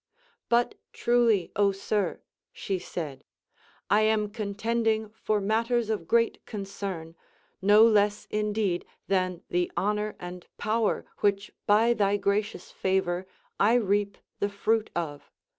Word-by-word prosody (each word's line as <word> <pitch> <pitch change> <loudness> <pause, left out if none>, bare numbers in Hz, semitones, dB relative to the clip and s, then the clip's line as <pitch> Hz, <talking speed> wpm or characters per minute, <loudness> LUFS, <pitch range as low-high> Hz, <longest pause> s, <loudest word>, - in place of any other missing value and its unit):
But 235 0 +3 0.2
truly, 235 -6 +2
Ο 200 0 +4
sir, 195 -1 -2 0.3
she 195 -2 -3
said, 155 -6 -6 0.6
I 210 - +4
am 215 -1 +2
contending 220 +1 -1
for 215 -1 -1
matters 225 +2 +1
of 170 -7 -3
great 230 0 +2
concern, 195 -5 -5 0.5
no 205 +3 +7
less 210 -2 +3
indeed 210 -4 0 0.2
than 185 -2 0
the 175 0 +1
honor 210 +1 0
and 180 0 -8
power 215 +1 0
which 200 0 +1 0.2
by 220 +3 +5
thy 205 -2 +2
gracious 200 -1 -1
favor 185 -1 0 0.3
1 225 +3 +4
reap 200 +1 +1 0.2
the 200 - +1
fruit 215 +2 0
of. 150 -4 -4
205 Hz, 125 wpm, -27 LUFS, 190-220 Hz, 0.6 s, no